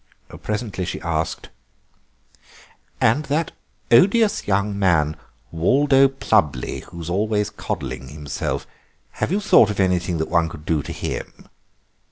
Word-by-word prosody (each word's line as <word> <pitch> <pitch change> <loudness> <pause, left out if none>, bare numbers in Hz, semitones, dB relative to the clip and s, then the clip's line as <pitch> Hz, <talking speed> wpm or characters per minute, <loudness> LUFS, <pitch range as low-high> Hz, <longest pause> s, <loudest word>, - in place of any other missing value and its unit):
Presently 105 -3 -3
she - - -4
asked: 80 -3 -3 1.5
"And 130 +8 +2
that 150 +3 -1 0.4
odious 205 - +4
young 100 0 0
man, 80 -6 +2 0.4
Waldo 135 - +4
Plubley, 100 - 0
who 85 - -11
is 80 - -7
always 105 +2 0
coddling 65 - -5
himself—have 75 - -6
you 200 - +2
thought 115 - +5
of 105 - -4
anything 90 -2 +1
that 80 - -2
one 85 -1 +2
could 75 -1 -11
do 80 -3 +1
to - - -7
him?" - - -6
95 Hz, 125 wpm, -22 LUFS, 80-115 Hz, 1.5 s, thought